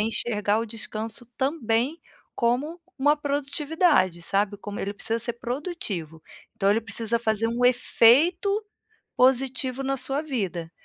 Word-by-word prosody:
enxergar 210 Hz, -1 st, +1 dB
o 230 Hz, -, -2 dB
descanso 225 Hz, +1 st, -5 dB
também 265 Hz, 0 st, 0 dB, 0.3 s
como 270 Hz, +9 st, 0 dB, 0.2 s
uma 290 Hz, +3 st, +4 dB
produtividade, 285 Hz, -, +1 dB
sabe. 200 Hz, +3 st, 0 dB
Como 205 Hz, 0 st, -7 dB
ele 200 Hz, +1 st, -3 dB
precisa 225 Hz, +3 st, -3 dB
ser 235 Hz, 0 st, -3 dB
produtivo, 235 Hz, -, -5 dB, 0.3 s
então 195 Hz, -1 st, +2 dB
ele 220 Hz, +3 st, +3 dB
precisa 225 Hz, +2 st, -1 dB
fazer 220 Hz, -1 st, 0 dB
um 240 Hz, +2 st, 0 dB
efeito 275 Hz, -, +4 dB, 0.7 s
positivo 260 Hz, 0 st, +2 dB
na 270 Hz, 0 st, -1 dB
sua 270 Hz, +2 st, 0 dB
vida. 190 Hz, -, -3 dB
235 Hz, 125 wpm, -25 LUFS, 210-275 Hz, 0.7 s, uma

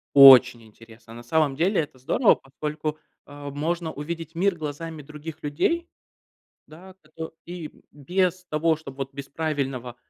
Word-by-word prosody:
Очень 130 Hz, -4 st, +9 dB
интересно. 115 Hz, +1 st, -16 dB
На 120 Hz, +1 st, -10 dB
самом 145 Hz, +2 st, +1 dB
деле- 180 Hz, +3 st, +2 dB
это 135 Hz, -3 st, -9 dB
здорово, 210 Hz, -, +3 dB
поскольку, 150 Hz, +2 st, -5 dB, 0.3 s
э, 145 Hz, 0 st, -8 dB
можно 160 Hz, +3 st, -2 dB
увидеть 165 Hz, +2 st, -6 dB
мир 190 Hz, +2 st, +2 dB
глазами 155 Hz, +1 st, -6 dB
других 150 Hz, +2 st, -9 dB
людей. 335 Hz, -, 0 dB, 0.8 s
Да, 185 Hz, +5 st, -14 dB
кото 160 Hz, 0 st, -8 dB
и, 175 Hz, -2 st, -6 dB
м, -, -, -23 dB
без 180 Hz, +5 st, -1 dB
того, 160 Hz, +1 st, +2 dB
чтоб 140 Hz, -4 st, -11 dB
вот 135 Hz, 0 st, -5 dB
без 140 Hz, 0 st, -7 dB
правильного, 135 Hz, -6 st, -3 dB
150 Hz, 150 wpm, -25 LUFS, 135-165 Hz, 0.8 s, Очень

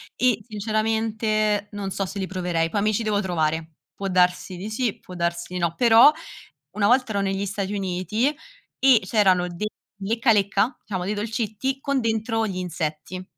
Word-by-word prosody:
e 245 Hz, -4 st, +2 dB
sinceramente 215 Hz, -1 st, 0 dB
non 200 Hz, -1 st, -4 dB
so 195 Hz, 0 st, -2 dB
se 195 Hz, -, -7 dB
li 195 Hz, -, -1 dB
proverei. 175 Hz, -3 st, -1 dB
Poi 205 Hz, -, 0 dB
mi 215 Hz, -, +2 dB
ci 225 Hz, -, 0 dB
devo 210 Hz, -2 st, +1 dB
trovare. 160 Hz, -3 st, -1 dB, 0.2 s
Può 200 Hz, -, -4 dB
darsi 180 Hz, 0 st, +1 dB
di 200 Hz, +5 st, -6 dB
sì, 230 Hz, -1 st, -1 dB
può 180 Hz, -, -12 dB
darsi 170 Hz, 0 st, -2 dB
di 180 Hz, -, -2 dB
no, 170 Hz, -1 st, 0 dB
però 235 Hz, +3 st, +7 dB, 0.6 s
una 200 Hz, +2 st, +1 dB
volta 250 Hz, 0 st, +3 dB
ero 200 Hz, -1 st, 0 dB
negli 195 Hz, 0 st, -1 dB
Stati 195 Hz, 0 st, -3 dB
Uniti 200 Hz, +8 st, -1 dB, 0.4 s
e 260 Hz, -3 st, +6 dB
c'erano 190 Hz, -4 st, +3 dB
dei 175 Hz, +4 st, -4 dB, 0.3 s
lecca 225 Hz, +4 st, +1 dB
lecca, 200 Hz, +3 st, +2 dB
diciamo 185 Hz, -4 st, -4 dB
dei 205 Hz, -, -1 dB
dolcetti, 220 Hz, +5 st, -2 dB
con 280 Hz, -1 st, 0 dB
dentro 225 Hz, 0 st, 0 dB
gli 190 Hz, -3 st, -4 dB
insetti. 170 Hz, 0 st, -4 dB
200 Hz, 175 wpm, -24 LUFS, 185-220 Hz, 0.6 s, però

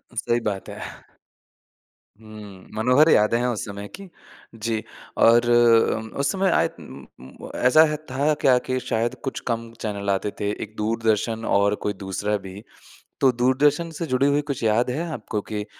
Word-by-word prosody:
सही 120 Hz, 0 st, 0 dB
बात 105 Hz, -4 st, -4 dB
है। -, -, -8 dB, 1.4 s
हुँ, 105 Hz, -3 st, -12 dB
मनोहर 125 Hz, +8 st, +4 dB
यादें 105 Hz, +2 st, +4 dB
है 125 Hz, +1 st, 0 dB
उस 115 Hz, -5 st, -2 dB
समय 100 Hz, 0 st, -7 dB
की। 195 Hz, -1 st, -11 dB, 0.5 s
जी 110 Hz, 0 st, -3 dB, 0.4 s
और 120 Hz, +1 st, +5 dB, 0.5 s
उम 110 Hz, 0 st, -6 dB
उस 140 Hz, -, +1 dB
समय 195 Hz, -1 st, +1 dB
आय -, -, +3 dB
उम -, -, -11 dB
उम्म 65 Hz, +1 st, -12 dB
ऐसा 130 Hz, +6 st, +6 dB
है 150 Hz, -, -1 dB
था 140 Hz, +4 st, +1 dB
कि -, -, +4 dB
आखिर 130 Hz, 0 st, +2 dB
शायद 120 Hz, +2 st, -1 dB
कुछ 135 Hz, -, -4 dB
कम 115 Hz, 0 st, -3 dB
चैनल 100 Hz, -2 st, -3 dB
आते 100 Hz, +1 st, 0 dB
थे। 100 Hz, -, 0 dB
एक 105 Hz, 0 st, -16 dB
दूरदर्शन 110 Hz, +1 st, -1 dB
और 100 Hz, +1 st, +2 dB
कोई 105 Hz, -, +1 dB
दूसरा 105 Hz, +2 st, -1 dB
भी। 95 Hz, +3 st, -9 dB, 0.6 s
तो 135 Hz, -, +5 dB
दूरदर्शन 140 Hz, +7 st, +2 dB
से 165 Hz, -, -3 dB
जुड़ी 130 Hz, +1 st, +1 dB
हुई 145 Hz, +1 st, +2 dB
कुछ 135 Hz, -3 st, -3 dB
याद 115 Hz, +3 st, +2 dB
है 160 Hz, +7 st, -2 dB
आपको 110 Hz, -4 st, -4 dB
कि 105 Hz, -1 st, -2 dB
अ, -, -, -10 dB
115 Hz, 175 wpm, -23 LUFS, 105-130 Hz, 1.4 s, ऐसा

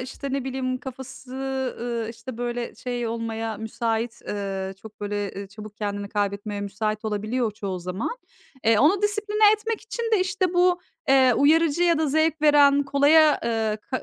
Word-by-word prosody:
işte, 260 Hz, +2 st, -6 dB
ne 275 Hz, -2 st, -1 dB
bileyim, 255 Hz, -1 st, -2 dB
kafası, 265 Hz, 0 st, -9 dB, 0.5 s
ııı, 235 Hz, -2 st, -3 dB
işte, 230 Hz, +1 st, -9 dB
böyle, 240 Hz, 0 st, -3 dB
şey 245 Hz, -2 st, -4 dB
olmaya 225 Hz, -1 st, -3 dB
müsait, 225 Hz, +1 st, -2 dB
ııı, 195 Hz, -1 st, -3 dB
çok 215 Hz, -1 st, -13 dB
böyle, 205 Hz, -1 st, -3 dB
eee, 200 Hz, 0 st, -7 dB
çabuk 210 Hz, +1 st, -11 dB
kendini 205 Hz, -1 st, -3 dB
kaybetmeye 205 Hz, 0 st, -2 dB
müsait 215 Hz, +2 st, -3 dB
olabiliyor 215 Hz, +3 st, -1 dB
çoğu 195 Hz, -3 st, -5 dB
zaman. 185 Hz, -, -4 dB, 0.5 s
Eee, 225 Hz, -1 st, +4 dB
onu 365 Hz, +9 st, +4 dB
disipline 420 Hz, 0 st, +3 dB
etmek 435 Hz, +1 st, -2 dB
için 445 Hz, +2 st, -6 dB
de, 425 Hz, -, +4 dB
işte, 370 Hz, -1 st, 0 dB
bu, 355 Hz, 0 st, +3 dB, 0.3 s
eee, 260 Hz, -2 st, +5 dB
uyarıcı 320 Hz, +4 st, +3 dB
ya 340 Hz, -2 st, +3 dB
da 315 Hz, -, +1 dB
zevk 315 Hz, +1 st, +1 dB
veren, 285 Hz, -1 st, +6 dB
kolaya, 290 Hz, +2 st, +5 dB
eee, 220 Hz, -2 st, 0 dB
ka 260 Hz, -, -2 dB
245 Hz, 165 wpm, -24 LUFS, 215-300 Hz, 0.5 s, veren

